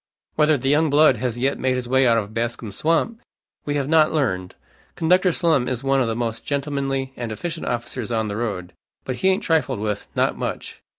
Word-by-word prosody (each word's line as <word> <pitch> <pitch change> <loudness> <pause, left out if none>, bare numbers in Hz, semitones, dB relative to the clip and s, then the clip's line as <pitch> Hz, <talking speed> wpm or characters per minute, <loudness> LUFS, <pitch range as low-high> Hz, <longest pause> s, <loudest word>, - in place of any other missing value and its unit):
Whether 155 -1 +3
the 135 +1 -3
young 150 +3 +3
blood 145 -2 +5
has 120 0 -2
yet 135 +3 0
made 130 0 +1
his 125 -1 -3
way 130 +1 +3
out 115 -1 +4
of 105 -1 -3
Bascom's 115 -3 -3
swamp, 165 - 0 0.4
we 145 - -1
have 140 -2 -1
not 155 0 +4
learned. 95 - -1 0.4
Conductor 180 +2 +3
Slum 160 -7 +1
is 125 0 -2
one 135 0 +2
of 125 - +1
the 115 - -1
most 115 -1 -3
gentlemanly 135 -2 -2
and 120 -2 -5
efficient 165 +9 -5
officers 120 0 -3
on 110 -2 0
the 100 - -4
road; 100 -6 -4 0.3
but 130 -1 -3
he 190 - +1
ain't 190 0 +2
trifled 160 -8 +1
with, 105 -1 -3
not - - +1
much. - - -5
130 Hz, 210 wpm, -22 LUFS, 115-150 Hz, 0.4 s, blood